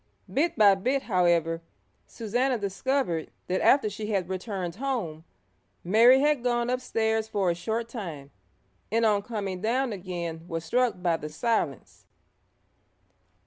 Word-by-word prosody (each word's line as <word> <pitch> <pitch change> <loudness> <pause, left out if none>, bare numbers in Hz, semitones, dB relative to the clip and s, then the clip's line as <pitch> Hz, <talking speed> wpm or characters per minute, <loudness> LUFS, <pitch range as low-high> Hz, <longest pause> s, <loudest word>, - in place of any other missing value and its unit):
Bit 325 +5 +1
by 205 -3 +7
bit, 255 +8 0
however, 170 -4 +2 0.5
Susannah 245 +4 -1
discovered 200 - -1 0.2
that 185 +1 -1
after 270 -5 +5
she 210 +1 -5
had 195 -4 -1
returned 185 -2 -4
home, 220 - -3 0.6
Mary 235 +8 +6
had 295 -4 +2
gone 240 0 +1
upstairs 220 -3 0
for 195 -5 +1
a - - 0
short 220 +7 -3
time, 165 - -7 0.6
and 230 +1 +2
on 210 -2 +3
coming 200 -4 -4
down 240 +3 0
again 175 -4 -5
was 165 -1 -4
struck 240 -1 0
by 170 -2 +2
the 150 - -7
silence. 160 - -2
210 Hz, 135 wpm, -27 LUFS, 175-240 Hz, 0.6 s, by